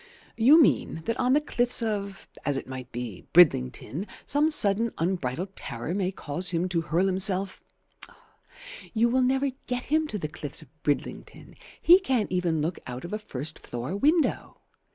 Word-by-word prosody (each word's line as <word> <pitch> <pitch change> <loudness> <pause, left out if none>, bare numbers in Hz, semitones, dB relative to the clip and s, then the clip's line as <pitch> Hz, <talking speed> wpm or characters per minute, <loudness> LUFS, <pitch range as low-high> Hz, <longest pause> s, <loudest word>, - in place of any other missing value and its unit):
"You 260 +8 +6
mean 165 - +2
that 230 - -2
on 250 +1 +2
the 290 - +5
cliffs 245 -5 +2
of, 200 -3 -4 0.2
as 145 -1 0
it - - -6
might 130 -1 -8
be, 120 -5 -7
Bridlington 160 - +3 0.2
some 295 +3 +2
sudden 225 -5 +2
unbridled 175 +1 -2
terror 120 +4 -4
may 190 -1 -1
cause 175 0 -3
him 175 +1 0
to 170 -2 0
hurl 165 +4 0
himself 190 0 +1 0.7
" - - -16
"You 230 +2 +3
will 260 +2 +2
never 265 +2 +1 0.2
get 250 -1 -2
him 310 +2 +1
to 215 - -4
the 155 - -4
cliffs 150 -2 -2
of 135 - -23
Bridlington. 145 -1 -4 0.3
He 355 +3 +7
can't 260 - -1
even 175 -4 0
look 170 +3 -3
out 125 +3 -6
of 175 - -7
a 215 - -2
first 150 -5 -4
floor 120 +9 -5
window. 305 - +1
190 Hz, 175 wpm, -26 LUFS, 155-245 Hz, 0.7 s, He